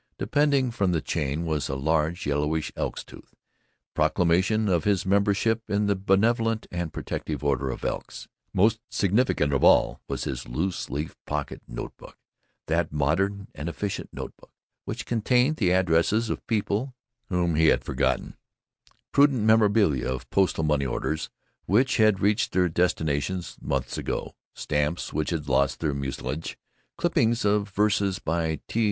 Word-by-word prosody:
Depending 145 Hz, -4 st, +2 dB
from 100 Hz, -6 st, 0 dB
the 80 Hz, -, +2 dB
chain 75 Hz, +3 st, -2 dB
was 80 Hz, -3 st, -1 dB
a 65 Hz, -, -2 dB
large, 80 Hz, +4 st, 0 dB
yellowish 75 Hz, +2 st, 0 dB
elk's -, -, -3 dB
tooth -, -, -15 dB, 0.6 s
proclamation 95 Hz, +6 st, +2 dB
of 85 Hz, -4 st, +2 dB
his 100 Hz, -3 st, +1 dB
membership 100 Hz, +3 st, +2 dB
in 105 Hz, +1 st, +1 dB
the 100 Hz, 0 st, +2 dB
Brotherly 110 Hz, +4 st, +2 dB
and 85 Hz, -2 st, -3 dB
Protective -, -, -4 dB
Order 70 Hz, -2 st, 0 dB
of -, -, -5 dB
Elks. -, -, -4 dB, 0.2 s
Most 110 Hz, +4 st, +3 dB
significant 100 Hz, -, +1 dB
of 70 Hz, -, +1 dB
all -, -, +4 dB
was -, -, -3 dB
his 65 Hz, -2 st, -4 dB
loose 85 Hz, +10 st, -2 dB
leaf 75 Hz, +3 st, -4 dB
pocket 75 Hz, -1 st, -3 dB
note -, -, -7 dB
book, -, -, -14 dB, 0.5 s
that -, -, 0 dB
modern 95 Hz, +8 st, 0 dB
and 75 Hz, +4 st, -5 dB
efficient 100 Hz, +3 st, -4 dB
note -, -, -7 dB
book -, -, -19 dB, 0.4 s
which 120 Hz, +2 st, -5 dB
contained 125 Hz, +6 st, +2 dB
the 95 Hz, -, +2 dB
addresses 95 Hz, +5 st, +2 dB
of -, -, -5 dB
people 110 Hz, +3 st, -1 dB, 0.3 s
whom 90 Hz, -2 st, +1 dB
he 80 Hz, +1 st, +4 dB
had -, -, +3 dB
forgotten, 65 Hz, -1 st, -1 dB, 0.8 s
prudent 140 Hz, -5 st, +4 dB
memoranda 105 Hz, -, +3 dB
of 65 Hz, -1 st, -5 dB
postal 95 Hz, -4 st, +2 dB
money 75 Hz, -3 st, +1 dB
orders 80 Hz, +5 st, -2 dB, 0.4 s
which 125 Hz, +8 st, +3 dB
had 110 Hz, -4 st, +4 dB
reached 105 Hz, +2 st, +1 dB
their 90 Hz, -1 st, +3 dB
destinations 85 Hz, 0 st, -1 dB
months 70 Hz, -2 st, -2 dB
ago, -, -, -3 dB, 0.2 s
stamps 75 Hz, +3 st, -2 dB
which 75 Hz, -, -1 dB
had 80 Hz, -4 st, -3 dB
lost 70 Hz, +1 st, +2 dB
their 75 Hz, -3 st, 0 dB
mucilage, 70 Hz, +2 st, -4 dB, 0.4 s
clippings 115 Hz, 0 st, +1 dB
of 105 Hz, 0 st, +2 dB
verses 100 Hz, -1 st, +1 dB
by 80 Hz, -1 st, -1 dB
T. 115 Hz, -, -2 dB
90 Hz, 150 wpm, -26 LUFS, 75-105 Hz, 0.8 s, all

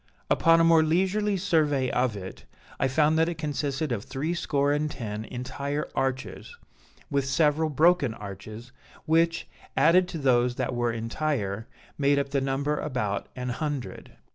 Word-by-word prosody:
Upon 165 Hz, 0 st, +5 dB
a -, -, +5 dB
more 165 Hz, -1 st, +6 dB
leisurely 190 Hz, +6 st, +1 dB
survey 155 Hz, -8 st, +1 dB
of 125 Hz, -4 st, 0 dB
it, 95 Hz, -1 st, -9 dB, 0.3 s
I 135 Hz, -, +2 dB
found 150 Hz, +4 st, +2 dB
that 165 Hz, +1 st, +3 dB
it 170 Hz, -, -5 dB
consisted 145 Hz, -2 st, -2 dB
of 110 Hz, -4 st, -2 dB
threescore 145 Hz, -1 st, -1 dB
and 150 Hz, +1 st, 0 dB
ten 110 Hz, -5 st, -5 dB
entire 140 Hz, +4 st, -4 dB
arches, 135 Hz, -, -3 dB, 0.5 s
with 140 Hz, -1 st, 0 dB
several 150 Hz, +2 st, +2 dB
broken 155 Hz, -5 st, +3 dB
arches, 105 Hz, +3 st, -9 dB, 0.3 s
which, 165 Hz, +1 st, +2 dB, 0.3 s
added 180 Hz, +3 st, +5 dB
to 170 Hz, -, -5 dB
those 125 Hz, -3 st, +2 dB
that 130 Hz, 0 st, -2 dB
were 120 Hz, -1 st, 0 dB
entire, 115 Hz, -2 st, -2 dB, 0.3 s
made 140 Hz, 0 st, +3 dB
up 140 Hz, 0 st, 0 dB
the 140 Hz, -1 st, 0 dB
number 140 Hz, +2 st, -1 dB
about 110 Hz, -9 st, -2 dB
an 125 Hz, -1 st, -4 dB
hundred. 145 Hz, 0 st, -4 dB
140 Hz, 150 wpm, -27 LUFS, 125-160 Hz, 0.5 s, more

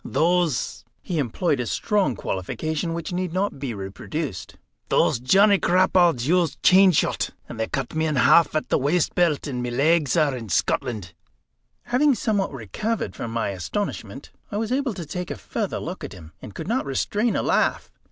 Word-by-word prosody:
Those" 170 Hz, -5 st, 0 dB, 0.2 s
he 170 Hz, -3 st, -2 dB
employed 140 Hz, +3 st, 0 dB
a 120 Hz, -, -2 dB
strong 200 Hz, -, 0 dB
qualification 155 Hz, -, -3 dB
which 170 Hz, +1 st, -5 dB
need 180 Hz, -1 st, -2 dB
not 190 Hz, -5 st, -1 dB
be 135 Hz, -2 st, -3 dB
reproduced 100 Hz, -, -5 dB, 0.3 s
"those -, -, +2 dB
Johnny 195 Hz, -, +4 dB
Crapauds 175 Hz, -7 st, +3 dB
used 175 Hz, -1 st, +1 dB
chain 190 Hz, 0 st, +7 dB
shot; 165 Hz, -, 0 dB, 0.2 s
and 115 Hz, -, -9 dB
they 110 Hz, -, 0 dB
cut 135 Hz, -3 st, -3 dB
me 160 Hz, 0 st, 0 dB
in 155 Hz, -, -1 dB
half 145 Hz, +6 st, +5 dB
at 155 Hz, -, -1 dB
the -, -, +2 dB
waistbelt, 160 Hz, +2 st, +1 dB
and 130 Hz, -4 st, -3 dB
my 125 Hz, -, -2 dB
legs 150 Hz, +4 st, +2 dB
are 150 Hz, -4 st, +2 dB
in 115 Hz, -4 st, -7 dB
Scotland." 105 Hz, -1 st, -1 dB, 0.7 s
Having 275 Hz, +2 st, +3 dB
somewhat 205 Hz, -3 st, 0 dB
recovered 140 Hz, -, -3 dB
from 115 Hz, -, -5 dB
my 115 Hz, -2 st, -1 dB
astonishment, 100 Hz, -, -5 dB, 0.2 s
I 205 Hz, -, -2 dB
was 220 Hz, +2 st, -2 dB
able 260 Hz, -4 st, 0 dB
to 175 Hz, -, -6 dB
take 180 Hz, +3 st, -5 dB
a -, -, -3 dB
further -, -, -3 dB
look -, -, -6 dB
at -, -, -6 dB
him, 80 Hz, -3 st, -12 dB
and 100 Hz, -, -10 dB
could -, -, -6 dB
not 235 Hz, -, -1 dB
restrain 210 Hz, -, 0 dB
a -, -, 0 dB
laugh. -, -, +1 dB
160 Hz, 180 wpm, -24 LUFS, 125-185 Hz, 0.7 s, chain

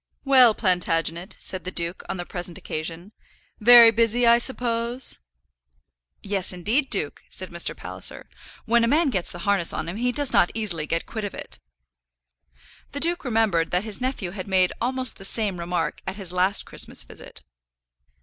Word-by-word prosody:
"Well, 255 Hz, -5 st, +6 dB
Plantagenet," 175 Hz, -2 st, -1 dB
said 185 Hz, -, -3 dB
the 185 Hz, -, -4 dB
duke, 170 Hz, -1 st, -4 dB
on 190 Hz, -, -3 dB
the 175 Hz, -, -5 dB
present 175 Hz, -2 st, -5 dB
occasion, 165 Hz, +5 st, -5 dB, 0.5 s
"very 235 Hz, +1 st, +8 dB
busy, 230 Hz, +1 st, +2 dB
I 235 Hz, 0 st, +6 dB
suppose?" 240 Hz, 0 st, 0 dB, 1.0 s
"Yes, 195 Hz, -2 st, 0 dB
indeed, 215 Hz, -, 0 dB
duke," 155 Hz, -8 st, -2 dB
said 185 Hz, -1 st, -6 dB
Mr. 170 Hz, 0 st, -2 dB
Palliser. -, -, -4 dB, 0.4 s
"When 235 Hz, 0 st, +3 dB
a -, -, +2 dB
man 295 Hz, +3 st, +2 dB
gets 185 Hz, -6 st, -2 dB
the -, -, -8 dB
harness 200 Hz, -4 st, +3 dB
on 160 Hz, -, -4 dB
him 175 Hz, +4 st, -5 dB
he 245 Hz, +2 st, 0 dB
does 285 Hz, +1 st, +1 dB
not 175 Hz, -, +4 dB
easily 175 Hz, -9 st, -2 dB
get 165 Hz, +2 st, -2 dB
quit 220 Hz, -2 st, -6 dB
of 205 Hz, -, -5 dB
it." -, -, -9 dB, 1.3 s
The 285 Hz, -, -3 dB
duke 345 Hz, +4 st, 0 dB
remembered 220 Hz, -, +1 dB
that 180 Hz, +2 st, 0 dB
his 215 Hz, +1 st, -5 dB
nephew 255 Hz, -8 st, -3 dB
had 190 Hz, 0 st, -7 dB
made 185 Hz, -2 st, +2 dB
almost 255 Hz, 0 st, 0 dB
the -, -, -12 dB
same 195 Hz, -2 st, +3 dB
remark 170 Hz, -1 st, -3 dB
at 190 Hz, -, -3 dB
his 190 Hz, -4 st, -2 dB
last 185 Hz, +2 st, +1 dB
Christmas -, -, -2 dB
visit. -, -, -11 dB
200 Hz, 170 wpm, -24 LUFS, 175-235 Hz, 1.3 s, very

